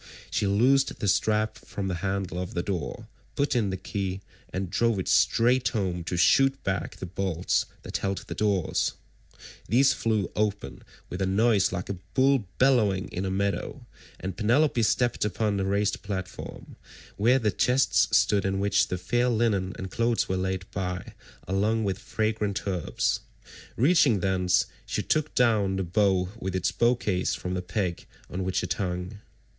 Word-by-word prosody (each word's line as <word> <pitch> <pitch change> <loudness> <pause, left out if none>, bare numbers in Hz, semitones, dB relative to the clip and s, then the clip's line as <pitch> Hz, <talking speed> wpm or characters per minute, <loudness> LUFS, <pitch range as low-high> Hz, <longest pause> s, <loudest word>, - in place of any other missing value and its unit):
She 100 - 0
loosed 130 +7 +3
the 105 - -1
strap 110 +2 +1
from 100 -1 -5
the 95 - -1
handle 95 -2 -2
of 90 - -6
the 85 - -1
door, 90 -6 -4 0.3
put 140 -1 0
in 110 -5 +1
the 95 - -3
key, 95 0 -4 0.3
and 95 0 -3
drove 115 +1 +2
it 95 - -3
straight 125 +1 +3
home 95 -6 -2
to 90 - -2
shoot 135 +8 +4
back 95 0 -2
the - - -7
bolts 90 -1 -1 0.2
that - - -3
held 95 0 -2
the - - -5
doors;161 100 -5 -3
these 135 +6 +5
flew 110 -6 -1
open 100 -9 -2 0.3
with 90 - -4
a 95 - +1
noise 100 0 +3
like 90 0 -4
a 100 -3 -5 0.2
bull 130 -5 +3
bellowing 110 -8 +3
in 95 - -3
a - - -1
meadow, 100 +1 -2 0.3
and 95 -1 -5
Penelope 120 +5 +2
stepped 120 +2 +1
upon 105 0 0
the 95 - 0
raised 100 +1 0
platform, 95 -2 -7 0.4
where 120 +6 +4
the 110 -5 +1
chests 125 +6 +3
stood 100 -2 +2
in 95 0 -1
which 100 0 +2
the 90 - -3
fair 120 +8 +1
linen 110 -5 +1
and 95 -1 -6
clothes 115 +2 +1
were 95 - -1
laid 95 0 -2
by 90 -2 -4 0.3
along 105 +4 +1
with 100 -1 -1
fragrant 110 -2 -2
herbs: 90 -5 -1 0.6
reaching 135 - +4
thence, 90 -1 +2 0.2
she - - -3
took 155 -1 0
down 110 -6 +3
the 95 - -1
bow 95 0 +1
with 95 -3 -3
its 95 - 0
bow 120 +1 +3
case 95 -6 -1
from 90 - -4
the 90 - -2
peg 90 -1 -3 0.2
on 95 +1 -3
which 95 0 -1
it - - 0
hung. 90 +1 -4
100 Hz, 170 wpm, -27 LUFS, 95-115 Hz, 0.6 s, these